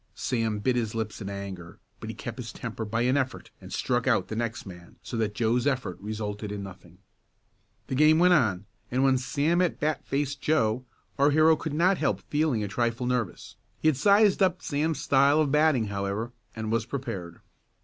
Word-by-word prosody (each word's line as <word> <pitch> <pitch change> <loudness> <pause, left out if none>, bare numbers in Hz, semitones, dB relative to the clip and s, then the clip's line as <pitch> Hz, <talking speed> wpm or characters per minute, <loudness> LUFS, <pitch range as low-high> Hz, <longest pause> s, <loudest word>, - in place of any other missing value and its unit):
Sam 115 -4 -1
bit 120 +5 0
his 115 -2 -1
lips 110 -1 -4
in 100 - -5
anger, 95 -3 -7 0.2
but - - -7
he - - -6
kept - - -7
his - - -6
temper 110 - -5
by 115 +2 -1
an 125 +3 +2
effort 130 -2 -3
and - - -11
struck - - -1
out - - +2
the 110 - -4
next 115 0 -3
man 90 -3 -12
so - - -6
that 110 -2 -1
Joe's 120 +3 +1
effort 130 -10 -1
resulted 105 0 -4
in 100 -1 -5
nothing. 90 -2 -12 0.9
The - - -5
game 155 +4 +5
went 180 +2 +5
on, 105 - +2 0.2
and 130 +2 +1
when 135 -1 +4
Sam 150 +7 +1
at 180 - 0
bat 150 -1 -1
faced 140 0 -2
Joe, 125 -5 +1 0.3
our 140 +1 +5
hero 155 +2 +5
could 155 -1 -5
not 180 +4 +3
help - - 0
feeling 145 -7 +1
a - - -2
trifle 120 +4 -1
nervous. 125 -7 -3 0.2
He 155 - +3
had 155 - +1
sized 200 - +4
up 185 -2 +2
Sam's 150 0 -1
style 140 +2 +4
of 150 -3 +2
batting, 150 -5 +3
however, 100 +4 -3 0.2
and 110 -1 -4
was 115 0 0
prepared. 115 -11 -5
125 Hz, 200 wpm, -27 LUFS, 105-150 Hz, 0.9 s, game